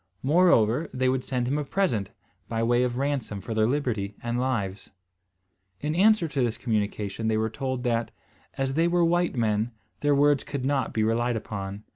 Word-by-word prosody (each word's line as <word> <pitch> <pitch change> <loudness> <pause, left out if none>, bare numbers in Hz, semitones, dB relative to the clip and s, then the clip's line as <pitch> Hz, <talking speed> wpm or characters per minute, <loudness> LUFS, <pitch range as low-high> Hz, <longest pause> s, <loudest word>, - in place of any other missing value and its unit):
Moreover, 145 -3 +3
they 130 0 0
would 130 0 0
send 125 -2 -1
him 145 +4 0
a - - -1
present, 135 - 0 0.4
by 115 0 -1
way 120 +1 +3
of 125 -1 0
ransom 135 -7 -2
for 115 +4 -5
their 110 0 +2
liberty 115 -7 -1
and 120 +1 -1
lives. 105 -7 -2 0.9
In 150 +6 -2
answer 200 0 +4
to 145 -3 -2
this 120 -2 0
communication 105 -1 -2
they 110 -1 +2
were 110 0 0
told, 130 0 -3
that, 115 -2 0 0.5
as 135 -1 -1
they 165 +4 +2
were 175 0 +3
white 175 -1 +1
men, 110 0 0 0.3
their 145 -1 +2
words 145 -1 +3
could 140 -3 -4
not 135 -1 0
be 110 - 0
relied 120 +2 +1
upon. 100 -2 -5
125 Hz, 185 wpm, -26 LUFS, 110-145 Hz, 0.9 s, answer